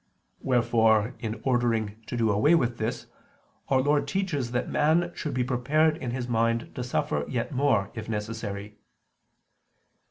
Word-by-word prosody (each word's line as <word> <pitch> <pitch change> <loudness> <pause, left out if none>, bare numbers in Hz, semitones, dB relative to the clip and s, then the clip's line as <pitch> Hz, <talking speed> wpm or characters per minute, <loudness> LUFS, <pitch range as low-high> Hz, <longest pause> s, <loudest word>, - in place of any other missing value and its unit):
Wherefore, 115 -3 +2
in 110 -1 -4
order 120 -3 +2
to 110 +3 -8
do 115 -2 +2
away 125 +12 +4
with 120 -6 0
this, 110 +2 -3 0.6
Our 130 -1 +4
Lord 145 +2 +2
teaches 170 -11 -1
that 125 +1 -1
man 165 +3 +2
should 150 -5 -4
be 125 - +1
prepared 140 +5 +2
in 130 - -4
his 125 0 -3
mind 115 0 0
to 125 - -4
suffer 75 -11 -1
yet 120 +2 -2
more 125 -8 +1
if 110 -1 -7
necessary. 105 -1 -5
120 Hz, 150 wpm, -27 LUFS, 110-135 Hz, 0.6 s, away